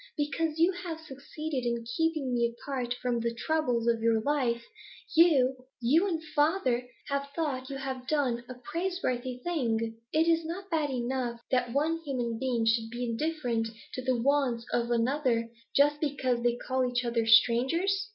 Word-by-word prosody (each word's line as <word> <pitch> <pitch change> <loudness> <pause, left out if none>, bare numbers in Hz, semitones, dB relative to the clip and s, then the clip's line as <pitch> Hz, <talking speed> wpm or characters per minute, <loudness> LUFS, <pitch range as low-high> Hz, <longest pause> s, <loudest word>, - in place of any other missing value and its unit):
Because 305 +1 -1
you 335 +3 +4
have 350 -3 -6
succeeded 295 -1 -5
in 235 -1 -1
keeping 315 -6 0
me 235 -1 +2
apart 250 -3 -3
from 245 -2 +1
the 235 0 -2
troubles 245 -4 0
of 230 -1 +2
your 225 -1 +3
life, 240 -2 0 0.5
you 285 -6 +5 0.2
you 300 +11 +3
and 325 -4 -2
father 280 -6 +2 0.2
have 280 0 -1
thought 275 -5 -2
you 275 - -4
had 265 -2 -5
done 260 -6 +1
a 255 - -6
praiseworthy 260 -3 -2
thing. 230 -9 -1
Is 320 +2 +3
it 320 - -7
not 380 +3 -6
bad 310 -3 +1
enough 245 -1 -2
that 250 -2 +1
one 315 +4 +1
human 245 -6 -2
being 245 -3 0
should 225 0 +2
be 240 +2 -3
indifferent 240 -2 -1 0.3
to 255 - -3
the 255 -1 +1
wants 260 -3 +1
of 235 0 +1
another, 235 -1 +1 0.2
just 290 +1 +4
because 260 -5 0
they 240 0 +2
call 260 +1 -1
each 245 0 0
other 235 -1 0
strangers? 270 - +4
260 Hz, 165 wpm, -29 LUFS, 235-305 Hz, 0.5 s, you